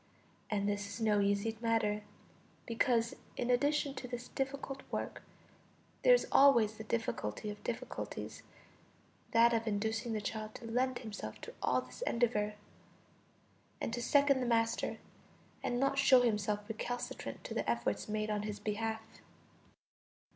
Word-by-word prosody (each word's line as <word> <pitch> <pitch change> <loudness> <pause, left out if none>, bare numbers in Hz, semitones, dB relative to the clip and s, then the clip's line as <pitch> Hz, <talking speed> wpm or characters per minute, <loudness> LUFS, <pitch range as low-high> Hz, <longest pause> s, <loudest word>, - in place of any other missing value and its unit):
And 200 -1 0
this 205 0 -1
is 200 - -7
no 215 -2 +3
easy 200 +3 +1
matter, 225 -2 +1 0.6
because, 230 0 +1 0.2
in 245 0 +1
addition 285 +2 +2
to 265 - -6
this 245 0 -6
difficult 270 0 -3
work, - - -3 0.8
there - - +8
is - - 0
always 240 -6 +6
the 220 - -6
difficulty 215 - -2
of 210 - -10
difficulties, 235 - -5 0.9
that 235 +1 +5
of 230 0 0
inducing 220 +2 -1
the 215 - 0
child 215 +1 -4
to - - -8
lend 250 +2 +1
himself 220 -4 -6
to 470 - -8
all - - +2
this - - -12
endeavor, 230 - +1 1.2
and 230 - -3
to 240 - -2
second 280 +1 +4
the 250 - -1
master, 230 -1 +1 0.6
and 245 - -1
not 275 +1 +2
show 260 -2 +7
himself 210 -3 0
recalcitrant 240 +2 -4
to - - -5
the - - -1
efforts - - -1
made 215 0 -1
on 210 -1 0
his 210 0 -4
behalf. 220 +1 -2
230 Hz, 145 wpm, -34 LUFS, 210-250 Hz, 1.2 s, there